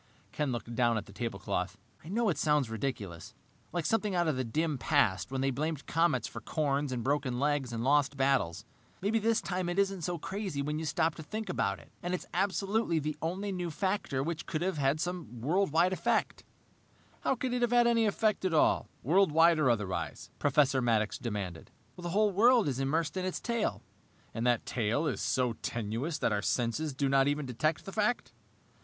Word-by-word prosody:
Ken 150 -3 -1
looked 120 -1 -4
down 120 -1 +2
at 105 - -4
the - - -14
tablecloth. 100 -3 -3 0.3
"I 155 - -10
know 225 +4 +1
it 170 - -1
sounds 150 -6 +2
ridiculous, 105 -8 -4 0.4
like 175 -3 -2
something 210 +1 +1
out 175 -1 +2
of 155 - +1
the 130 - -1
dim 150 +4 -1
past, 120 -7 +2
when 135 -1 -1
they 135 0 +1
blamed 150 +2 -3
comets 165 +2 +1
for - - -8
corns, 145 -2 -1
and 120 -2 -2
broken 135 -2 0
legs, 145 -3 0
and 115 0 -3
lost 145 +1 +3
battles. 135 -12 +1 0.4
Maybe 210 +4 +1
this 225 +1 +2
time 180 -1 -2
it 175 - -3
isn't 195 -2 +1
so 175 +2 -2
crazy 190 -2 -4
when 150 +2 -2
you 160 - -3
stop 155 +2 +1
to - - -6
think 215 +8 -5
about 100 0 0
it, - - -17
and 175 +1 -1
it's - - -6
absolutely 195 +1 +1
the 155 0 -1
only 190 +5 -2
new 180 -2 -3
factor 165 -6 -1
which 165 +2 -4
could 155 +1 -2
have 150 -5 +1
some 175 -9 -4
worldwide 170 - +2
effect." - - 0 0.8
"How - - +1
could 255 0 -2
it 250 - 0
have 240 -1 +2
any 235 -2 +4
effect 215 0 +1
at 185 -3 +1
all 115 -7 +3
worldwide 165 0 +5
or 145 -4 +4
otherwise?" 105 -6 -2
Professor 140 -2 +3
Maddox 110 -3 +1
demanded. 100 -8 -4 0.3
"The 175 -1 -5
whole 210 +3 +3
world 230 +2 +5
is 135 -2 -1
immersed 160 +6 0
in 185 - -1
its 185 - -2
tail." 235 -2 -1 0.5
"And 115 +2 -1
that 120 -2 +2
tail 120 +6 0
is 145 - -1
so 125 -2 +1
tenuous 120 +8 -2
that - - 0
our 105 - 0
senses 125 +8 0
do 140 +1 +1
not 135 0 +4
even 145 0 0
detect 155 +6 -1
the 195 - -6
fact!" 215 +4 0
150 Hz, 195 wpm, -31 LUFS, 125-185 Hz, 0.8 s, worldwide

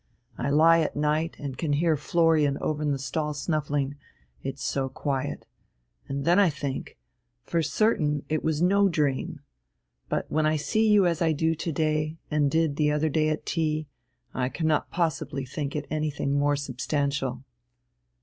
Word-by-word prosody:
I 125 +6 -2
lie 165 +3 +6
at 160 - -1
night 150 +3 0
and 140 -3 -5
can 150 -1 -1
hear 160 +2 +2
Florian 155 -2 +2
over 155 -1 -2
in 150 -1 +1
the 140 - 0
stall 150 +2 -2
snuffling, 145 -2 -1 0.4
it's - - -5
so 135 -1 -1
quiet. 135 -1 -3 0.6
And 140 0 -3
then 175 +4 +5
I 200 -3 +5
think, 140 -2 -5 0.5
for 170 +4 0
certain 150 -3 +1
it 155 0 -1
was 160 +1 +1
no 200 +2 +4
dream. 145 -2 -1 0.7
But - - -1
when 155 0 +2
I 155 - +2
see 220 +9 +1
you 205 -2 +6
as 170 -2 0
I 165 -2 +3
do 160 +2 +1
to 165 +1 -3
day, 155 +1 0
and 150 -2 +2
did 160 -1 +1
the 150 -1 +3
other 150 +1 +1
day 155 +1 +2
at 155 - -2
tea, 155 -2 -1 0.5
I 125 -1 -1
cannot 155 0 0
possibly 155 -5 -1
think 140 +3 -4
it 150 0 -2
anything 150 -2 -1
more 145 0 +2
substantial." 140 -1 -2
150 Hz, 170 wpm, -26 LUFS, 140-160 Hz, 0.7 s, lie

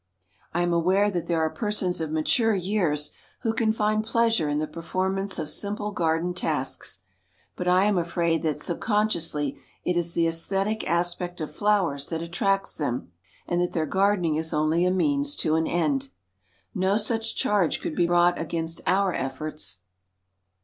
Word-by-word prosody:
I 175 +1 0
am 175 0 +1
aware 190 +5 +3
that 175 -3 -3
there 165 -2 +1
are 160 - +2
persons 210 -6 -1
of 160 - -2
mature 205 +9 +2
years 175 -6 0 0.3
who 225 -2 0
can 225 -1 +2
find 215 0 +1
pleasure 225 -8 +2
in 145 - 0
the 155 - 0
perform 185 +4 -2
ance 195 0 -2
of - - -3
simple 205 +5 -1
garden 170 -1 0
tasks. 135 - -3 0.5
But 180 - -4
I 180 +2 +4
am 205 -3 +2
afraid 170 -1 0
that 155 -3 -1
subconsciously 170 - 0 0.2
it 180 - 0
is 170 -1 +1
the 170 - +3
aesthetic 195 +6 0
aspect 175 +1 +1
of 155 - -5
flowers 190 -10 +1
that 165 -1 -3
attracts 195 +3 0
them, 125 - -3 0.4
and 175 0 +1
that 175 - -1
their 160 -2 0
gardening 190 -4 +2
is 160 0 -1
only 155 +3 +2
a 180 - +3
means 285 +9 +1
to 155 - +1
an 160 0 +2
end. 145 -6 0 0.6
No 190 +2 +2
such 225 +1 0
charge 200 -6 +1
could 155 - -4
be 175 - +2
brought 175 0 +3
against 165 0 -3
our 190 -1 +3
efforts. 135 - -4
175 Hz, 170 wpm, -26 LUFS, 160-200 Hz, 0.6 s, I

